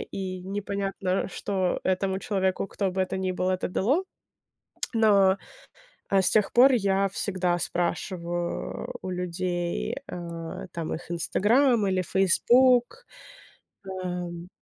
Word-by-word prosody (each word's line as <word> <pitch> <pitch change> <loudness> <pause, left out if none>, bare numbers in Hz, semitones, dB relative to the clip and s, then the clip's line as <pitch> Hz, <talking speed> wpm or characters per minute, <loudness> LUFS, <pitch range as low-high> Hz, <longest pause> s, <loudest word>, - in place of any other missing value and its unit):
и 185 -1 -5
непонятно, 195 -1 -2
что 190 -1 -1
этому 190 0 0
человеку, 195 -4 -1
кто 195 -1 -2
бы 190 - -2
это 185 0 -1
ни 190 0 -1
был, 185 0 -1
это 185 0 -1
дало. 260 - +1 0.9
Но, 200 -4 +4 0.7
э, 195 - +4
с 185 - +3
тех 210 -2 +2
пор 260 +3 +7
я 195 -4 +2
всегда 185 -2 -1
спрашиваю 175 0 -3
у 185 - -5
людей, 180 -1 -2
э, - - -5 0.5
там, 165 -2 -4
их 170 +1 -9
"Инстаграм" 215 - +3
или 185 -1 +1
"Фейсбук". 245 - +3 0.8
Ам. 180 -2 -5
190 Hz, 120 wpm, -26 LUFS, 180-200 Hz, 0.9 s, пор